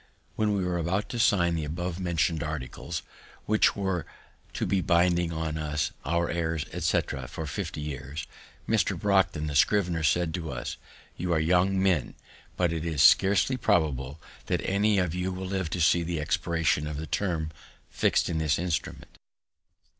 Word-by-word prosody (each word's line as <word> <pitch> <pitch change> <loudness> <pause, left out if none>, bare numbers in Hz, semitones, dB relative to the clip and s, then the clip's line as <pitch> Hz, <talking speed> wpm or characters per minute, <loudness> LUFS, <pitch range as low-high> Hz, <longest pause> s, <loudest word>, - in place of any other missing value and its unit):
When 105 -1 +1
we 95 -2 0
were 90 -1 -1
about 95 +5 -1
to 120 - -4
sign 90 -6 +3
the 80 -2 -1
above 85 +4 -4
mentioned 85 -3 0
articles, 80 +2 -5 0.4
which 110 0 +3
were 95 -5 -2 0.5
to - - -2
be 95 0 +1
binding 85 -1 +2
on 80 -1 -3
us, 75 -1 -1
our 85 +1 0
heirs, 80 -2 -1
etc., 65 -2 -1
for 80 - -6
fifty 75 +1 -4
years, 70 0 -5 0.4
Mr. - - +1
Brockden, 95 -6 +2
the 75 - -3
scrivener, 85 +2 +2
said 80 +3 +1
to 85 -3 -4
us, 60 -1 -5 0.4
"You 90 0 -1
are 80 - +2
young 90 +4 +2
men, 95 -7 +1 0.4
but 90 -2 +2
it 80 -1 -3
is 80 -4 +1
scarcely 100 +7 +5
probable 75 - 0 0.3
that - - 0
any 100 +2 +2
of 90 -4 +1
you 90 +1 -2
will 95 +1 -5
live 95 -3 -2
to 90 - -3
see 85 +1 +4
the 85 -1 -2
expiration 80 0 0
of 75 -1 -4
the 80 - -4
term 80 -1 -1 0.4
fix'd - - +2
in 80 - -1
the 80 -2 0
instrument." 85 -1 -4
85 Hz, 170 wpm, -27 LUFS, 80-90 Hz, 0.5 s, scarcely